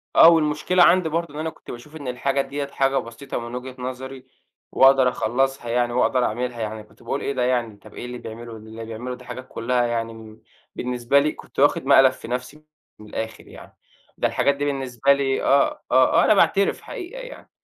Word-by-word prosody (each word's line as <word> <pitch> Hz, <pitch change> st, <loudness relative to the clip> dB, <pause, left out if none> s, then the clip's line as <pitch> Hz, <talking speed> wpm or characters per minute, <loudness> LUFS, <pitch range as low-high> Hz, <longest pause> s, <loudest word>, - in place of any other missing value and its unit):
آه، 165 Hz, -, +9 dB
والمشكلة 160 Hz, +2 st, +3 dB
عندي 175 Hz, -1 st, +4 dB
برضه 165 Hz, -1 st, -2 dB
إن -, -, -5 dB
أنا 160 Hz, +1 st, -2 dB
كنت -, -, -12 dB
باشوف 135 Hz, +6 st, -11 dB
إن 145 Hz, -4 st, -8 dB
الحاجة 135 Hz, +2 st, 0 dB
دِيَّة 140 Hz, +1 st, -4 dB
حاجة 135 Hz, -1 st, 0 dB
بسيطة 115 Hz, +4 st, -5 dB
من 120 Hz, +1 st, -7 dB
وجهة 130 Hz, +1 st, -7 dB
نظري، 130 Hz, +1 st, -6 dB, 0.5 s
وأقدر 135 Hz, -1 st, +5 dB
أخلّصها 125 Hz, +1 st, -1 dB
يعني 120 Hz, 0 st, 0 dB
وأقدر 125 Hz, 0 st, +2 dB
أعملها 120 Hz, +1 st, -3 dB
يعني، 110 Hz, 0 st, -4 dB
كنت 105 Hz, -, -22 dB
باقول 140 Hz, -, -3 dB
إيه 140 Hz, -, -2 dB
ده 125 Hz, -2 st, -1 dB
يعني، 120 Hz, -4 st, 0 dB
طَب 105 Hz, +1 st, -16 dB
إيه -, -, -7 dB
اللي 125 Hz, 0 st, -6 dB
بيعملُه؟ 115 Hz, 0 st, -9 dB
اللي 110 Hz, +1 st, -9 dB
بيعملُه 115 Hz, +3 st, -6 dB
دي -, -, -15 dB
حاجات 125 Hz, +1 st, -8 dB
كلّها 120 Hz, +1 st, 0 dB
يعني 115 Hz, -1 st, -2 dB
من 110 Hz, -1 st, -12 dB, 0.4 s
بالنسبة 125 Hz, +2 st, +1 dB
لي 150 Hz, +2 st, +1 dB
كنت -, -, -11 dB
واخِد 145 Hz, +1 st, +3 dB
مقلب 135 Hz, -1 st, +6 dB
في -, -, -11 dB
نَفْسي 125 Hz, +5 st, -5 dB, 0.4 s
من 105 Hz, -, -12 dB
الآخر 110 Hz, +1 st, -6 dB
يعني، -, -, -14 dB, 0.4 s
ده -, -, +2 dB
الحاجات 140 Hz, 0 st, +1 dB
دي 145 Hz, -, -2 dB
بالنسبة 135 Hz, -1 st, +1 dB
لي 135 Hz, -1 st, -1 dB
آه، 140 Hz, 0 st, +2 dB
آه، 130 Hz, 0 st, +5 dB
آه، -, -, +3 dB
أنا -, -, +5 dB
باعترف 200 Hz, -1 st, +2 dB
حقيقة 385 Hz, +6 st, -8 dB
يعني. -, -, -11 dB
130 Hz, 205 wpm, -23 LUFS, 120-140 Hz, 0.5 s, آه